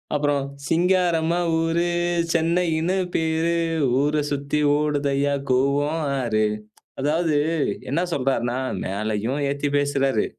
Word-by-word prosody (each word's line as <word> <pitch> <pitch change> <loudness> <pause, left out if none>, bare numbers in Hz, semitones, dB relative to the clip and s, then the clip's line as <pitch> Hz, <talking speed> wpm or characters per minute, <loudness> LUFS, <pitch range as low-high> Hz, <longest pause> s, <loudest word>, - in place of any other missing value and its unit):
அப்றம், 145 -1 +1 0.2
"சிங்காரம்மா 170 -1 +2 0.2
ஊரு, 165 +1 +1 0.5
சென்னையினு 170 +1 +1 0.2
பேரு. 160 +1 +1 0.5
ஊர 145 +2 +1 0.2
சுத்தி 140 +1 -1 0.2
ஓடுதய்யா 145 -1 0 0.2
கூவம் 140 +5 +1 0.2
ஆறு" 110 -4 +1 0.6
அதாவது 155 +2 +1 0.5
என்ன 165 +5 +1
சொல்றார்னா, 130 -3 0 0.3
மேலயும் 110 +6 -2
ஏத்தி 140 +1 -2
பேசுறாரு. 135 -5 +1
145 Hz, 90 wpm, -23 LUFS, 135-165 Hz, 0.6 s, சிங்காரம்மா